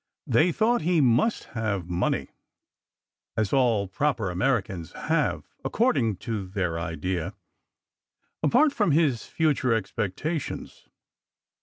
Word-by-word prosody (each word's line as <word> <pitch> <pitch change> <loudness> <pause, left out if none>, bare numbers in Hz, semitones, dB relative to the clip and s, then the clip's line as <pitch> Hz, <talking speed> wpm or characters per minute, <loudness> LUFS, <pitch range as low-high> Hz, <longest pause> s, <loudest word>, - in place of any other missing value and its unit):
They 170 +3 +3
thought 225 +4 +2
he 170 +1 +2
must 130 - +3
have 100 -6 -2
money 90 0 -1 1.1
(as 110 -3 0
all 115 -7 +3
proper 115 -1 0
Americans 95 - -1
have, - - 0 0.2
according 135 - +1
to 110 -5 -3
their 90 -4 -2
idea) 90 +1 -3 1.1
apart 285 +4 +4
from 205 - +2
his 145 -7 +2
future 130 -7 +2
expecta 110 - -3
tions. - - -8
115 Hz, 110 wpm, -26 LUFS, 95-155 Hz, 1.1 s, apart